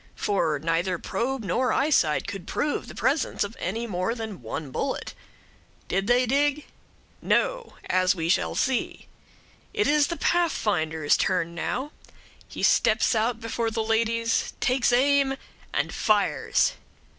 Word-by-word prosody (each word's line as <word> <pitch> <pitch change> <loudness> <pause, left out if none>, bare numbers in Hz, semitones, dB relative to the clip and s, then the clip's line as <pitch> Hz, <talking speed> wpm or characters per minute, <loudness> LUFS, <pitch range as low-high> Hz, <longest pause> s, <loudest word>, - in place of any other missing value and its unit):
for 165 -7 0
neither 165 +4 0
probe 240 +8 -3
nor 245 +7 0
eyesight 270 - +2
could 195 -3 -6
prove 295 0 -2
the - - -10
presence 275 -3 0
of 205 +2 -6
any 225 +6 -2
more 190 +1 -2
than 220 - -6
one 135 +5 -5
bullet. 270 - -3 0.7
Did 195 +1 -1
they 245 +1 +4
dig? 290 +3 +1 0.6
No; - - 0
as 185 +1 +2
we 165 -2 -2
shall 170 - +1
see. 260 -2 -1 0.7
It 420 - +2
is 295 0 +3
the 340 - -4
Pathfinder's 175 - +1
turn 180 -3 0
now; 260 - -3 0.6
he - - -7
steps - - +3
out 225 +1 0
before 230 0 -2
the 225 0 -2
ladies, 230 +1 0
takes 250 -1 +2
aim, 270 +2 +3 0.3
and - - -1
fires. 210 -2 +2
225 Hz, 135 wpm, -26 LUFS, 185-265 Hz, 0.7 s, they